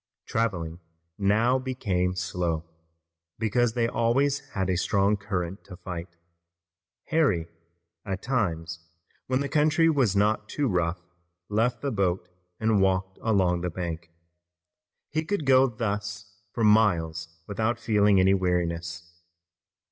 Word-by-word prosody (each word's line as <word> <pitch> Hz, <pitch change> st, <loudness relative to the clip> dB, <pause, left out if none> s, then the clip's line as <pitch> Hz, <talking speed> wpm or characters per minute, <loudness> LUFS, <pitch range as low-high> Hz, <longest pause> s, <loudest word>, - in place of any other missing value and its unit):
Traveling 90 Hz, -8 st, -2 dB, 0.4 s
now 110 Hz, +6 st, +3 dB
became 95 Hz, -9 st, -1 dB
slow, 85 Hz, -3 st, -2 dB, 0.7 s
because 115 Hz, +2 st, +1 dB
they 115 Hz, -1 st, +1 dB
always 130 Hz, +5 st, +1 dB
had 95 Hz, -2 st, -1 dB
a 95 Hz, -, +1 dB
strong 100 Hz, +3 st, +2 dB
current 95 Hz, -2 st, -4 dB
to 95 Hz, -2 st, -10 dB
fight. 90 Hz, -1 st, -6 dB, 1.0 s
Harry, 120 Hz, -, +2 dB, 0.6 s
at 100 Hz, -1 st, -4 dB
times 85 Hz, -10 st, -1 dB, 0.5 s
when 130 Hz, +1 st, +1 dB
the 140 Hz, -, -1 dB
country 155 Hz, +3 st, +3 dB
was 130 Hz, -10 st, +2 dB
not 105 Hz, +2 st, +1 dB
too 145 Hz, -2 st, 0 dB
rough, 90 Hz, -3 st, 0 dB, 0.5 s
left 115 Hz, +4 st, +1 dB
the 140 Hz, -, 0 dB
boat 95 Hz, -4 st, 0 dB, 0.3 s
and 110 Hz, -2 st, +2 dB
walked 95 Hz, 0 st, 0 dB
along 95 Hz, -6 st, +2 dB
the 90 Hz, -, -1 dB
bank. 85 Hz, -1 st, -5 dB, 1.0 s
He 155 Hz, +1 st, 0 dB
could 165 Hz, -2 st, -2 dB
go 135 Hz, 0 st, +6 dB
thus 105 Hz, -3 st, -4 dB, 0.2 s
for 115 Hz, -, -2 dB
miles 85 Hz, -7 st, +3 dB, 0.2 s
without 110 Hz, +4 st, -1 dB
feeling 105 Hz, -3 st, +3 dB
any 95 Hz, +1 st, +5 dB
weariness. 85 Hz, -2 st, -1 dB
100 Hz, 125 wpm, -27 LUFS, 90-115 Hz, 1.0 s, go